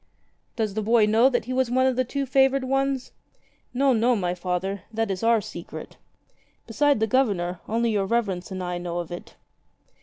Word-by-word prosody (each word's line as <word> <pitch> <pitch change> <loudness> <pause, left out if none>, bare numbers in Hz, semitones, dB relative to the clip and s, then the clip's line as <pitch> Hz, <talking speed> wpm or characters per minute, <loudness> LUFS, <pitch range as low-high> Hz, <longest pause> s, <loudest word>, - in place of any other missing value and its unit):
"Does 215 -3 -1
the 215 - -2
boy 225 +1 +4
know 225 +5 +4
that 245 -4 -1
he 255 - -4
was 260 -1 +1
one 260 +1 +2
of 260 -1 +2
the 255 - +2
two 275 +3 -3
favoured 270 +1 +3
ones 270 0 -1 0.3
?" - - -39 0.3
"No, 270 +1 +3
no, 240 +2 +3
my 180 -4 -1
Father. 180 +2 -3
That 225 -2 -1
is 185 - -3
our 230 -1 +3
secret. - - -9 0.7
Beside 285 +3 +2
the 220 - +2
Governor, 200 -8 0
only 230 +1 +1
your 200 -2 0
Reverence 195 -6 -1
and 185 -1 -5
I 180 0 -3
know 175 -1 -4
of 175 -1 -4
it." 175 - -8
225 Hz, 195 wpm, -25 LUFS, 190-255 Hz, 0.7 s, boy